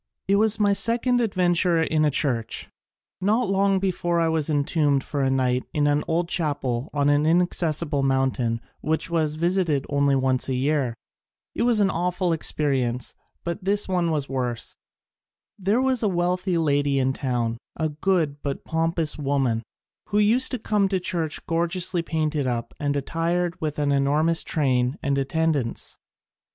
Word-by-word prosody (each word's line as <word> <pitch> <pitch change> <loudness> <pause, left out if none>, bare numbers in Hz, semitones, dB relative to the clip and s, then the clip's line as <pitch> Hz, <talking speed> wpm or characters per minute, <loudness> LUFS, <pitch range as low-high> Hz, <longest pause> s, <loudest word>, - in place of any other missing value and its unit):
It 200 +1 +3
was 220 +1 +3
my 205 -1 +3
second 240 +4 +2
ad 220 -4 -1
venture 175 -1 +2
in 155 -1 +1
a - - +4
church. 125 -6 -2 0.5
Not 210 +2 +1
long 195 0 +2
before 175 -2 0
I 165 -1 +2
was 160 -2 0
entombed 145 -1 +1
for 145 - -3
a 135 - +2
night 130 -1 +1
in 150 -1 +1
an 145 0 +2
old 170 +1 0
chapel 140 -7 -2
on 145 -1 +1
an 145 +1 +3
inaccessible 165 -3 +1
mountain 130 -4 0 0.2
which 160 +3 -2
was 155 -3 0
visited 170 -4 0
only 140 -1 +2
once 130 -1 +1
a 130 - 0
year. 135 -2 0 0.6
It - - -3
was 230 -3 +3
an 195 -1 +3
awful 180 +1 -1
experi 150 -3 0
ence, 120 0 -3 0.3
but 170 +3 -4
this 200 +2 +2
one 180 -3 0
was 150 -3 -1
worse. 125 -3 -3 0.8
There 200 +5 +1
was 260 -2 +2
a 215 - +2
wealthy 180 0 0
lady 145 -3 +1
in 130 0 +1
town, 120 -4 -2 0.2
a 160 -1 -1
good 155 -2 0
but 140 -1 -4
pompous 165 -1 0
woman, 135 -5 0 0.5
who 205 - -1
used 225 +5 +4
to - - 0
come 210 -3 +1
to 195 - 0
the - - +1
church 170 -4 -2
gorgeously 170 +1 -1
painted 155 -4 -1
up 120 -2 -3
and 145 -1 -1
attired 165 +4 -1
with 155 -2 -2
an 145 -1 +1
enormous 150 +4 +2
train 130 -2 0
and 140 0 +1
attendants. 145 -3 -1
155 Hz, 165 wpm, -24 LUFS, 140-180 Hz, 0.8 s, a